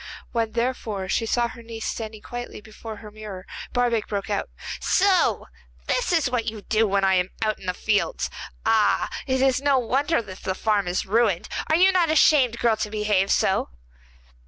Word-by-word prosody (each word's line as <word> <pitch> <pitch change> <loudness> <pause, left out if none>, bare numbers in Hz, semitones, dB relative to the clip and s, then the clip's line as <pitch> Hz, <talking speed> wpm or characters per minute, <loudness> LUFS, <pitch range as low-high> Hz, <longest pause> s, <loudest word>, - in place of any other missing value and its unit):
When, 230 -2 -1
therefore, 230 -5 -2
she 225 - 0
saw 240 +1 +1
her 235 - -11
niece 225 -1 -7
standing 220 -2 -5
quietly 245 0 -7
before 220 +1 -9
her 210 0 -11
mirror, 205 -3 -9 0.3
Barbaik 240 -3 +1
broke 200 +1 -3
out: 200 - -1 0.3
'So 385 -1 +2 0.4
this - - 0
is 330 -5 +3
what 245 -2 -1
you 215 -2 -4
do 220 +2 +2
when 195 0 +1
I 190 0 +4
am 180 0 +2
out 215 -1 0
in 190 - -11
the 180 - -1
fields! 220 - 0 0.4
Ah! 220 -2 +3 0.2
it 260 0 +1
is 265 -1 +3
no 280 -1 +3
wonder 270 +6 +1
if 195 -4 -5
the 190 - -2
farm 205 -2 +1
is 175 +1 -1
ruined. 210 -3 +1 0.2
Are 315 - +4
you 370 +3 +6
not 355 -3 +2
ashamed, 280 -6 +4
girl, 230 -2 +2
to 210 - -2
behave 210 -2 +1
so? 190 - +2
225 Hz, 185 wpm, -24 LUFS, 205-250 Hz, 0.4 s, you